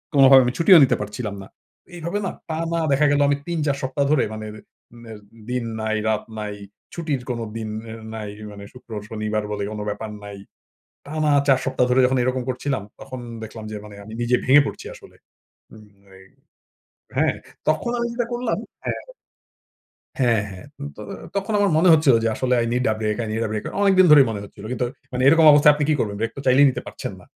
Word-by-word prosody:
কোনোভাবে 135 -1 +8
আমি 125 - -1
ছুটিও 180 +2 +7
নিতে 130 - +3
পারছিলাম 105 0 -5
না। - - -12 0.5
এইভাবে 170 +4 -3
না - - -2 0.2
টানা 165 +1 -2
দেখা 140 +2 +3
গেলো 145 0 +2
আমি 140 0 +2
৩ 170 -1 -2
৪ 140 -1 +1
সপ্তাহ 130 +2 -1
ধরে 150 -5 +3
মানে, 110 0 -6
অ্যা - - -11
রে - - -15 0.4
নের 110 -2 -10 0.3
দিন 125 -1 -1 0.2
নাই 110 0 -1
রাত 110 - 0 0.2
নাই, 105 -1 -4 0.4
ছুটির 155 -6 -2
কোন 120 -1 -2 0.2
দিন 110 -1 -5 0.2
অ্যা 110 - -7 0.2
নাই, 105 -2 -5 0.2
মানে 100 -1 -10
শুক্রবার, 115 -5 -8
শনিবার 110 -1 -2
বলে 105 -1 -3
কোন 105 - -6
ব্যাপার 110 +1 -5
নাই। 100 -1 -8 0.7
টানা 155 0 0 0.2
৪ 135 -2 +5
সপ্তাহ 130 -1 +1
ধরে 125 +1 +4
যখন 130 +1 +1
এরকম 130 0 -1
করছিলাম 130 -2 -2 0.2
তখন 130 -1 -8 0.2
দেখলাম 110 0 -9
যে, - - -5
মানে 105 -1 -11
আমি 110 - -10
নিজে 120 +1 +2
ভেঙে 135 +3 +7
পড়ছি - - -6
আসলে। - - -16 0.6
উম 110 -1 -15 0.3
এই 95 - -17 0.9
হ্যাঁ, - - +2 0.3
তখন 155 +9 +1
আমি 235 - 0
যেটা 240 -1 -1
করলাম 240 +1 -1 0.3
হ্যাঁ। - - -3 1.2
হ্যাঁ, 120 -4 +3
হ্যাঁ। 95 +7 -11 0.3
তো - - -9 0.3
তখন 200 +3 -2
আমার 205 -1 +3
মনে 170 +3 +4
হচ্ছিল 150 -5 +5
যে, 115 - +2
আসলে 125 -1 +1
i - - -1
need 125 +1 0
a - - -1
break, 105 -1 -1
i - - -5
need 110 +1 -1
a - - -5
break, 110 - -3 0.2
অনেকদিন 190 -2 +5
ধরেই 145 -3 +8
মনে 105 -2 -4
হচ্ছিল। 100 - -13
কিন্তু 125 0 -1 0.3
মানে 125 0 -1
এরকম 165 +2 +6
অবস্থায় 145 0 +7
আপনি 150 0 -1
কি 155 - +4
করবেন? 100 -2 -2
ব্রেক 115 0 -1
তো - - -5
চাইলেই 130 +3 +6
নিতে - - -5
পারছেন - - -6
না? - - -16
130 Hz, 205 wpm, -22 LUFS, 110-150 Hz, 1.2 s, কোনোভাবে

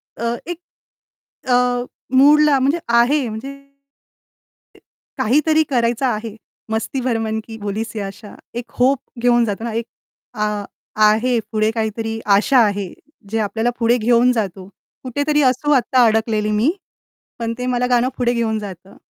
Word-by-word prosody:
अ, 235 +1 -2
एक, 350 -1 -5 0.9
अ, 245 -1 +2 0.3
मूडला 295 +1 +6
म्हणजे 280 +6 +1 0.2
आहे 255 +3 +3
म्हणजे 225 +6 -6
ते 275 0 -22 1.5
काहीतरी 305 +6 +3
करायचं 240 -1 +1
आहे. 220 -3 -2 0.3
मस्ती 220 +4 -2
भरे 240 -2 0
मन 220 0 -2
की 225 -1 -8
भोलिसी 215 +1 -4
आशा, 200 +2 -8 0.2
एक 240 0 -6
होप 260 +2 +3 0.2
घेऊन 240 -1 +4
जातो 205 +1 -4
ना 235 - -3
एक, 230 0 -2 0.5
अ, 210 -2 -2 0.4
आहे 230 +3 +3
पुढे 215 0 +1
काहीतरी 225 0 -3 0.2
आशा 250 +6 +3
आहे, 200 -3 -3 0.4
जे 225 - -1
आपल्याला 220 +2 0
पुढे 235 +1 +3
घेऊन 240 +2 +3
जातो. 195 -5 -3 0.4
कुठेतरी 285 +4 0
असू 260 +3 +1
आत्ता 255 -2 +4
अडकलेली 220 -1 +1
मी, 220 +9 +2 0.7
पण 230 -1 -2
ते 250 - -3
मला 250 0 0
गाणं 245 +1 +3
पुढे 245 -1 +1
घेऊन 225 -2 0
जातं. 195 -2 -10
235 Hz, 145 wpm, -19 LUFS, 220-255 Hz, 1.5 s, मूडला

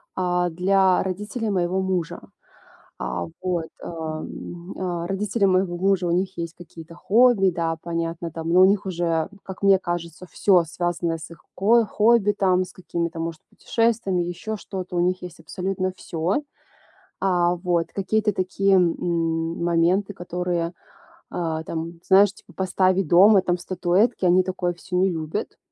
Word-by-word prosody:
а, 180 -1 +1
для 185 +2 +3
родителей 210 +4 -3
моего 185 -1 0
мужа. 185 -3 -2 0.8
А, 75 +8 -3 0.2
вот, 175 -3 -1 0.2
а, 160 -2 -5
м, 175 +3 -8
а. 175 -2 -3
Родители 200 +2 0
моего 185 -1 +1
мужа, 190 0 +1
у 170 - +1
них 185 0 -1
есть 170 -1 -4
какие-то 165 -1 -12
хобби, 215 0 +4
да, 165 -1 -2
понятно 165 0 -3
там, 165 +1 -5
но 180 +2 +5
у - - +9
них 200 +1 +1
уже, 170 -3 -1 0.2
как 190 0 -9
мне 195 -1 +6
кажется, 175 0 -5
всё, 185 -4 +4
связанное 170 0 -2
с 160 - -9
их 165 - -14
ко 225 +4 +4
хобби 215 0 +3
там, 185 -2 +2
с 185 - -13
какими-то, 170 -2 -4
может, 165 -1 -4
путешествиями, 225 -6 0
еще 175 +5 -4
что-то, 185 -3 -7
у - - +2
них 180 +1 +1
есть 175 -2 -9
абсолютно 185 +2 -3
всё. 175 - -2 0.8
А, 175 -2 +2
вот. 175 -1 0
Какие-то 210 +2 0
такие, 195 +1 +1
м, 165 -2 0
моменты, 175 +4 +2
которые, 175 -2 -3 0.6
э, 160 -2 -2
там, 165 +1 -5
знаешь, 195 +1 +6
типа - - -19
поставь 185 0 +1
дома 190 +5 +6
там 180 -1 0
статуэтки, 185 +5 0
они 180 +1 +5
такое 180 -1 -2
всё 180 +1 -7
не 190 +1 +3
любят. 160 +5 -4
180 Hz, 155 wpm, -23 LUFS, 170-190 Hz, 0.8 s, у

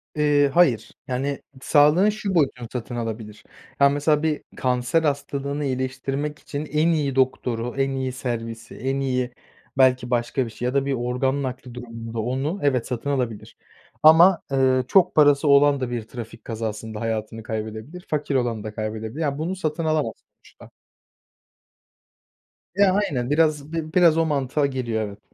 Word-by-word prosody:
Eee, 145 -2 +3
hayır. 145 -11 +3 0.2
Yani, 135 +2 -2 0.2
sağlığın 150 +9 +5
şu 205 -3 -3
boyutunu 130 -6 +1
satın 120 -1 -5
alabilir. 110 -2 -5 0.4
Ya, 140 0 +6
mesela 150 +2 +1
bir 155 -2 0 0.2
kanser 125 +5 +1
hastalığını 140 0 -2
iyileştirmek 135 +3 -3
için 145 +1 -5
en 155 +3 +1
iyi 150 -5 +1
doktoru, 125 -2 0
en 135 0 +1
iyi 130 -1 -2
servisi, 115 -3 -5
en 135 +2 -2
iyi 125 -2 -1 0.5
belki 130 -2 +3
başka 120 +2 0
bir 115 - -7
şey 120 +3 -6
ya 125 - 0
da 140 0 +1
bir 140 - 0
organ 130 +3 -1
nakli 130 -1 -6
durumunda 115 -2 -7
onu 135 - -2
evet, 130 -5 +1
satın 125 +2 -3
alabilir. 125 -6 -3 0.5
Ama, 170 +3 +7
eee, 130 -1 +3
çok 185 -2 +4
parası 145 -1 +5
olan 140 0 +5
da 130 - -2
bir 120 -1 -2
trafik 115 -2 -9
kazasında 110 -1 -5
hayatını 110 0 -3
kaybedebilir, 110 - -6
fakir 150 -2 -1
olan 120 -4 0
da 110 -1 -6
kaybedebilir. 110 +6 -4
Ya, 140 -2 -1
bunu 170 +5 -2
satın 160 -2 -2
alamaz 155 -8 0 0.3
uçta. - - -17 2.1
Ya, 195 -1 +4
aynen. 140 -12 0
Biraz 155 0 +1
bi 160 -1 -4
biraz 170 -3 +5
o 165 - +3
mantığa 145 -1 0
geliyor, 125 -5 -2
evet. 100 0 -11
135 Hz, 155 wpm, -23 LUFS, 120-150 Hz, 2.1 s, Ama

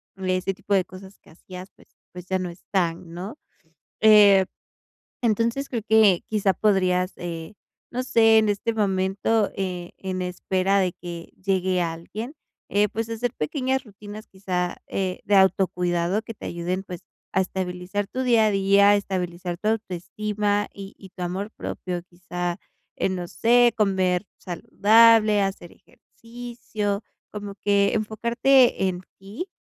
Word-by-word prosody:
ese 185 0 -1
tipo 200 +2 -4
de 185 -2 +2
cosas 190 +1 -13
que - - -21
hacías, 185 +3 -11
pues - - -21 0.3
pues 180 0 -10
ya 190 - 0
no 180 -1 -3
están, 170 -1 -2
¿no? 190 - -7 0.7
Eh, 205 -3 +7 0.8
entonces 235 +4 0
creo 235 -4 -3
que 215 -5 +5
quizá 205 -3 +1
podrías, 185 -3 +2
eh, 165 0 -6 0.4
no 250 +1 -2
sé, 225 -3 +5
en 215 -1 +3
este 205 +3 0
momento, 200 +1 +1
eh, 180 -2 -4
en 185 -1 -4
espera 185 +2 0
de 185 -2 0
que 170 -1 -9
llegue 185 -2 +1
alguien, 175 - -5 0.4
eh, 205 +1 +3
pues 225 +2 -4
hacer 230 +1 -2
pequeñas 260 - -1
rutinas 210 0 -11
quizá, 180 -2 -3
eh, 185 -1 -3
de 205 - +1
autocuidado 180 0 +2
que 230 - -8
te 215 - -10
ayuden, 175 +2 -3
pues, 180 -3 -8 0.3
a 190 - +4
estabilizar 185 +2 -3
tu 260 +6 -4
día 235 -4 +4
a - - +3
día, 200 0 +4
a 205 - +6
estabilizar 180 -3 -3
tu 210 - -2
autoestima 205 0 -1
y 195 -1 -10
y 195 - -13
tu 180 - -9
amor 190 +4 -3
propio, 180 -5 -5
quizá 175 0 -4 0.4
en, 190 - 0
no 175 -1 -5
sé, 240 +3 +4
comer 190 -2 +1
saludable, 215 +3 +4
hacer 195 -3 -4
ejercicio, 230 -3 -6 0.3
como 205 -1 -7
que 200 -1 +2
enfocarte 235 +1 +3
en 180 -1 -4 0.2
ti 200 - -7
195 Hz, 145 wpm, -24 LUFS, 180-215 Hz, 0.8 s, Eh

